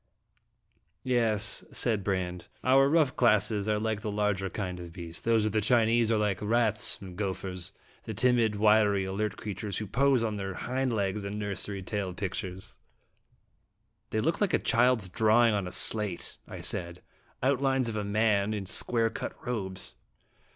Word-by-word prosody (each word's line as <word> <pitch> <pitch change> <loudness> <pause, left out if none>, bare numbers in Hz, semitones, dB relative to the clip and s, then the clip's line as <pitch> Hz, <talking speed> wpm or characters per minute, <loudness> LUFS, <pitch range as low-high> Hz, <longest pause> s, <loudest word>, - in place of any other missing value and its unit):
"Yes," 110 -4 +2
said 110 -5 0
Brande; 90 -3 -2 0.2
"our 135 +2 +5
rough 155 -4 +3
classes 105 -3 +3
are 105 - +2
like 110 0 -2
the 110 - -3
larger 100 -2 0
kind 90 -3 -4
of 85 -1 -8
beast; 85 -1 -8
those 115 -2 +3
of 110 - 0
the 110 +1 +1
Chinese 115 0 +3
are 110 - +3
like 105 -3 0
rats 110 0 +1
and 95 -2 -9
gophers 95 -2 -3 0.3
the 110 - -5
timid, 120 -1 +2
wiry, 105 -2 +3
alert 100 +2 -2
creatures 100 -1 -4
who 105 - -3
pose 130 +3 +2
on 110 -2 -2
their 95 -1 -4
hind 130 0 -2
legs 100 -2 -1
in 100 +1 -4
nursery 100 -1 -4
tale 95 -2 -3
pictures." 95 -1 -5 0.6
" - - -46
They 110 - 0
look 165 - 0
like 205 - +3
a - - +4
child's 120 -4 +2
drawing 110 +4 +3
on 100 -3 -1
a - - -6
slate," 95 +1 0
I - - -8
said; 85 0 -2 0.2
" - - -20
outlines 135 -1 +2
of 115 - -3
a 105 - -2
man, 105 0 +1
in 100 -2 -4
square 115 +4 +1
cut - - -5
robes." 95 -6 -4
105 Hz, 170 wpm, -29 LUFS, 95-115 Hz, 0.6 s, our